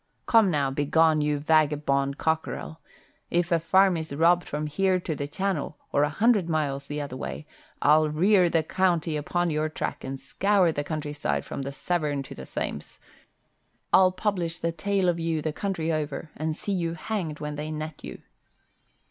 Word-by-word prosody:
"Come 225 -4 +5
now, 145 -5 +1
begone, 155 +3 +3
you 150 0 +1
vagabond 145 -2 +2
cockerel! 160 0 -2 0.5
If 175 +1 0
a 170 - +4
farm 190 +3 +4
is 160 -3 -5
robbed 170 +3 +3
from 150 +1 -3
here 185 +5 +1
to 170 -2 -3
the 145 0 -4
Channel, 175 -2 -2
or 145 - +2
a 145 - +3
hundred 205 +1 +2
miles 140 -3 -1
the 145 0 -4
other 140 -3 -5
way, 150 - -6 0.4
I'll 155 +1 +5
rear 180 +4 +4
the 165 -1 +2
county 170 -2 +1
upon 175 +3 -1
your 155 +1 0
track 155 - -4
and 135 0 -5
scour 185 +6 +2
the 145 -2 -2
countryside 145 - -3
from - - -5
the 135 +1 -4
Severn 145 -1 -1
to - - -10
the 65 -1 -10
Thames. - - -5 1.0
I'll 185 -1 +6
publish 185 -3 -2
the 165 - -1
tale 195 +3 0
of 170 -1 +1
you 165 -1 -1
the 155 0 -2
country 165 -3 -2
over 155 0 -3
and 155 0 -2
see 205 - -5
you 170 -3 -1
hanged 165 -4 -4
when 150 0 -4
they 150 +1 -5
net 155 -1 -6
you." - - -9
155 Hz, 180 wpm, -26 LUFS, 150-175 Hz, 1.0 s, I'll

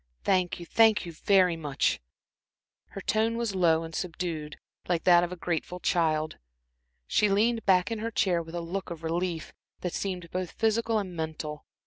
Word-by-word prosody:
Thank 185 -3 +1
you 175 - -7
thank 220 +2 +4
you 170 - -6
very 185 +1 +3
much." 150 -4 0 0.9
Her 195 - -8
tone 220 +3 +1
was 235 -3 -1
low 165 -3 +3
and 165 0 -8
subdued, 160 -3 -4 0.3
like 170 -2 +1
that 175 -1 +6
of 175 - -2
a - - -4
grateful 175 +1 -3
child. 155 -3 0 0.7
She 210 - +2
leaned 225 +3 +2
back 185 +2 +4
in 225 - -2
her 225 +1 -2
chair 185 -6 +1
with 165 +1 -9
a 170 - -2
look 185 +4 -4
of 170 -1 -7
relief, 170 0 -2 0.3
that 180 - -3
seemed 180 -4 -4
both 185 -2 -3
physical 225 0 +1
and 190 -4 -3
mental. 155 -2 -5
180 Hz, 175 wpm, -28 LUFS, 165-200 Hz, 0.9 s, that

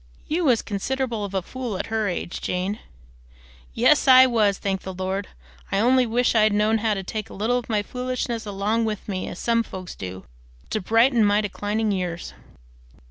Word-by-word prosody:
"You 335 +2 0
was 245 -5 +3
considerable 230 +2 -2
of 200 -1 -5
a 190 - 0
fool 245 -2 -5
at - - -3
her 220 -2 +1
age, 175 -1 -4
Jane." 185 +4 -2 1.0
"Yes, - - +4
I 260 0 +9
was, 215 -6 +2
thank 195 -1 -2
the 190 -1 -7
Lord! 190 +2 -3 0.4
I - - +1
only 250 +4 +4
wish 240 +2 +2
I'd 215 -2 +4
known 215 +2 +2
how 215 -1 +1
to 195 - -4
take 215 +2 -5
a - - -10
little 230 +5 +1
of 245 - -11
my 210 -2 +1
foolishness 250 -1 -3
along 205 +3 0
with 215 -2 -4
me, 185 -3 -3
as - - -7
some 230 +2 +1
folks 190 -5 -7
do, 95 0 -8 0.5
to 215 - -1
brighten 230 +4 +4
my 205 0 +4
declining 210 +1 -1
years." 180 - -3
215 Hz, 190 wpm, -24 LUFS, 195-235 Hz, 1.0 s, I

